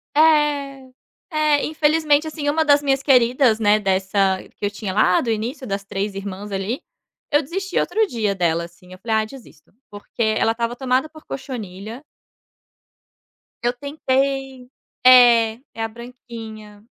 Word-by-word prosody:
É, 290 -4 +2 0.4
é 305 -2 +2
infelizmente 305 0 +2
assim, 305 -2 -3
uma 315 +2 +1
das 285 0 +5
minhas 270 -1 +1
queridas, 250 -3 +3
né, 210 -1 +3
dessa, 190 -1 +1 0.2
que - - -3
eu - - +1
tinha 205 -2 -5
lá 185 -3 +3
do 235 - -2
início 235 +6 -4
das 200 -3 -3
3 195 +1 -3
irmãs 200 +1 -7
ali. 195 +6 -3 0.5
Eu 290 0 +4
desisti 375 +6 -3
outro 440 0 +1
dia 215 - -1
dela 170 -2 0
assim, 180 +2 -18
falei: 220 +2 -1
"Ah - - -5
desisto", 215 - -15 0.2
porque 205 +3 -9 0.2
ela 225 - +2
estava 235 +1 -2
tomada 260 +2 0
por 310 0 -16
cochonilha 225 -3 -7 1.6
Eu 240 +1 +1
tentei. 270 -1 -2 0.4
É, 240 -3 +7 0.2
é 225 - -4
a - - -1
branquinha 225 -3 -11
240 Hz, 145 wpm, -21 LUFS, 205-280 Hz, 1.6 s, É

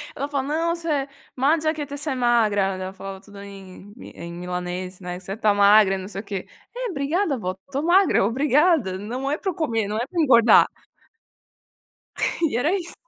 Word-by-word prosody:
Ela 280 - -3
fala: 280 -2 -2 0.2
"Non 335 0 +1
se, 305 -5 -2 0.3
mangia 310 +4 +2
che 300 -2 -5
sei 295 -1 -3
magra" 220 -6 +2
ela 185 0 -6
falava 195 0 -8
tudo 205 -1 -14
em 195 0 -12
milan - - -12
em 170 0 -7
milanês, 180 +1 -5
né, 180 -1 -6
você 190 +1 -7
está 215 0 +2
magra 200 -1 +5
e - - -3
não 190 0 -7
sei 195 -1 -6
o - - -19
quê. 200 -3 -6 0.3
É - - -3
obrigada 305 0 -1
vó, 185 -4 -4
estou 280 +1 -3
magra 355 - +4
obrigada, 270 - +2
não 245 +7 -4
é 295 - 0
para 380 +1 -3
comer, 230 -11 -1
não 210 +1 -3
é 235 - -1
para 345 +1 -1
engordar. 240 -6 +6 1.8
E 295 -8 +1
era 290 +7 +1
isso. 350 -3 -5
230 Hz, 190 wpm, -23 LUFS, 195-295 Hz, 1.8 s, engordar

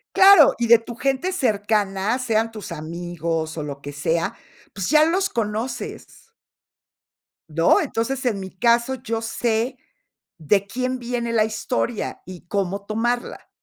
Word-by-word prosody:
¡Claro!, 390 +1 +8
y 235 - +1
de 235 +1 +8
tu 230 +1 -9
gente 275 +9 -1
cercana, 210 - 0
sean 225 -2 0
tus 215 -5 -8
amigos 165 0 -4
o 155 - -3
lo 140 -1 -7
que 145 - -7
sea, 160 +4 -1 0.4
pues 195 -2 -4
ya 305 0 +6
los 375 +4 +1
conoces. 230 - -5 1.2
¿No?, 165 +2 +3
entonces, 260 +4 -2
en 220 -5 0
mi 190 -1 -6
caso, 235 +5 +2
yo 230 -3 -4
sé 230 +2 -1 0.6
de 190 +5 +1
quién 255 +3 -2
viene 235 -1 -3
la 220 -2 +3
historia 220 +1 -3
y 180 -1 -11
cómo 200 +1 -2
tomarla. 240 +3 -2
225 Hz, 140 wpm, -22 LUFS, 190-245 Hz, 1.2 s, Claro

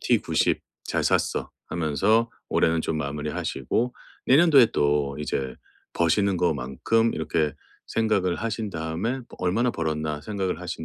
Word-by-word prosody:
T90 - - +2 0.2
잘 - - -1
샀어.' - - +1 0.2
하면서 100 +9 +2 0.2
올해는 80 0 +2
좀 80 - -1
마무리하시고. 75 - -2 0.3
내년도에 140 -2 +7
또 70 -1 +1
이제 65 -2 -2 0.4
버시는 95 +3 +2
거만큼 85 - +1
이렇게 80 -1 0 0.4
생각을 100 -6 +1
하신 110 -2 -3
다음에 80 +7 -2
뭐 125 - -10
'얼마나 110 +7 +1
벌었나?' 80 -2 -2
생각을 95 -2 -2
하신 90 -2 -5
85 Hz, 295 characters per minute, -25 LUFS, 75-110 Hz, 0.4 s, 내년도에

